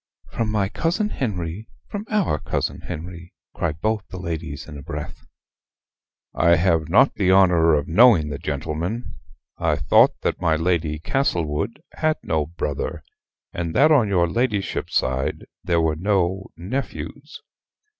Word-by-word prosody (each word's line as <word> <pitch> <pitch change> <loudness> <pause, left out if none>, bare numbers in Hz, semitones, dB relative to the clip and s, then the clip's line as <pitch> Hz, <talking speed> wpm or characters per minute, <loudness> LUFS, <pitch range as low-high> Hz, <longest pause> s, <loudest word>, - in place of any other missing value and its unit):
"From 115 -2 -2
my 105 -2 +1
cousin 170 - -1
Henry 100 - -4 0.2
from 205 +1 -5
our 195 - +1
cousin - - -3
Henry" 85 +2 -8 0.2
cry 85 -3 -1
both 105 +6 -1
the 95 - -8
ladies 80 -4 -5
in 80 - -9
a 70 - -8
breath. - - -7 1.1
"I 85 +1 +4
have 80 -2 +1
not 105 +10 +5
the 95 -2 0
honor 90 -4 +5
of 75 - -1
knowing 95 -5 +5
the 70 - -5
gentleman. 80 - -3 0.5
I - - +2
thought - - +4
that - - -2
my 80 -3 +3
Lord 85 0 +1 0.2
Castlewood 85 - -1
had 155 -1 0
no 80 -2 0
brother: 75 -4 -4 0.5
and 85 -1 -3
that 150 +4 +5
on 130 -8 +5
your 90 -3 +3
ladyship's 105 +1 -1
side 65 +1 0 0.2
there 85 -2 +1
were 80 -1 +1
no 95 +1 0
nephews." 130 +11 -5
85 Hz, 145 wpm, -22 LUFS, 80-110 Hz, 1.1 s, not